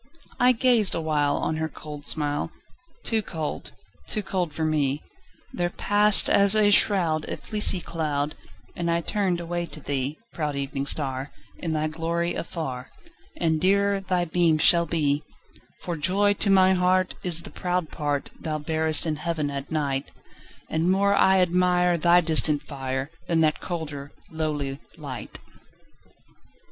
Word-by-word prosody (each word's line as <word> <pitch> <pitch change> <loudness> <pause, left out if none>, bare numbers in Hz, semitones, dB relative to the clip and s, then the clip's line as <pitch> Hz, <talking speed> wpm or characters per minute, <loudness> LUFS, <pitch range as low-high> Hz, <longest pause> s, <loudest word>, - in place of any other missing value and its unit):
I 250 +1 +5
gazed 235 -4 +3
awhile 150 -3 0
On 155 - -2
her 160 0 -2
cold 150 -1 -9
smile; 145 0 -1 0.5
Too 225 -1 0
cold—too 155 - -6
cold 180 -4 -2
for 160 +2 -3
me— 150 -2 0 0.5
There 175 0 -1
passed, 205 +2 +5
as 200 +1 +5
a 210 -1 +5
shroud, 170 -7 +3
A - - -4
fleecy 210 -3 +4
cloud, 150 -3 -3 0.4
And 170 -1 -2
I 170 0 +1
turned 185 -1 -1
away 175 0 -4
to 155 - -10
thee, 140 0 -3 0.2
Proud 150 -3 -3
Evening 140 0 -3
Star, 135 -2 -1 0.3
In 165 -2 -3
thy 155 0 -1
glory 165 +2 -2
afar 135 -7 -5 0.5
And 160 -2 0
dearer 200 +1 +2
thy 180 -2 -1
beam 170 -1 +2
shall 170 +2 +4
be; 150 -2 0 0.6
For 175 - -4
joy 195 +6 +2
to 205 0 0
my 190 -1 +5
heart 185 0 +1
Is 170 -2 +2
the - - -10
proud 180 -3 -3
part 145 -2 -3
Thou 155 -2 -3
bearest 160 +1 +3
in 155 -2 -2
Heaven 155 -2 -3
at 140 0 -6
night, 140 -3 -2 0.6
And 160 +2 0
more 200 +2 +2
I 190 -1 +4
admire 180 0 +2
Thy 175 +2 +5
distant 155 -3 +2
fire, 135 0 -5 0.2
Than 165 -1 +1
that 155 -1 +1
colder, 145 -5 -6 0.2
lowly 150 -4 -3 0.2
light. 140 -5 -7
160 Hz, 150 wpm, -24 LUFS, 150-180 Hz, 0.6 s, I